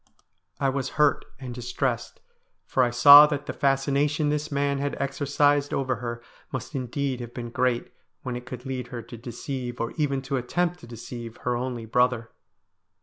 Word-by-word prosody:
I 135 - +2
was 135 -1 -2
hurt 150 -1 +3
and 130 -2 -6
distressed, 125 0 -3 0.4
for 130 - +1
I 125 - +4
saw 145 +5 +10
that 145 -1 -3
the - - -4
fascination 140 +2 +1
this 150 0 -2
man 140 0 0
had 140 0 -2
exercised 145 +1 +1
over 130 -3 0
her 120 -1 -5 0.3
must 130 +3 -5
indeed 135 0 -2
have 120 -1 -8
been 120 -1 -5
great 125 -1 0 0.3
when 125 -2 -3
it 125 +1 -7
could 125 0 -8
lead 130 -2 -4
her 120 -2 -7
to 115 - -10
deceive, 120 +1 -6
or 115 - -2
even 140 -3 0
to 135 0 -2
attempt 175 +8 -1
to - - -13
deceive, 115 0 -8
her 125 -1 +1
only 120 -1 -3
brother. 120 0 +1
130 Hz, 175 wpm, -26 LUFS, 120-140 Hz, 0.4 s, saw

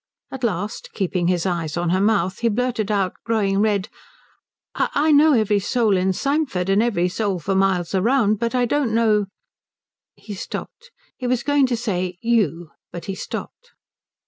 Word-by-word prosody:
At 265 -1 -7
last, 205 -2 -2
keeping 180 -3 -1
his 180 -1 +1
eyes 170 -4 -2
on 175 -1 0
her 185 +1 +2
mouth 195 -3 +1
he 235 - +2
blurted 230 -2 -1
out, 195 -3 0
growing 205 -4 +1
red, 210 -2 +1 0.9
"I 305 +2 +1
know 300 +1 +6
every 215 -4 +2
soul 220 0 +1
in 185 +1 +1
Symford, 275 - -1
and 195 +2 +4
every 200 -7 +1
soul 195 +1 -1
for 185 +4 -2
miles 190 -2 +1
round, 215 +1 +2
but 235 +1 -1
I 250 -1 +2
don't 245 -3 0
know 215 -3 +2 0.4
" - - -71
He 210 - -9
stopped. 475 - -7 0.3
He 250 - -4
was 250 -1 0
going 285 -2 +3
to 245 -2 -1
say 185 -6 -2
"you," 185 -8 0 0.2
but 175 - -7
he 195 - -3
stopped. 485 - -7
210 Hz, 170 wpm, -21 LUFS, 185-240 Hz, 0.9 s, know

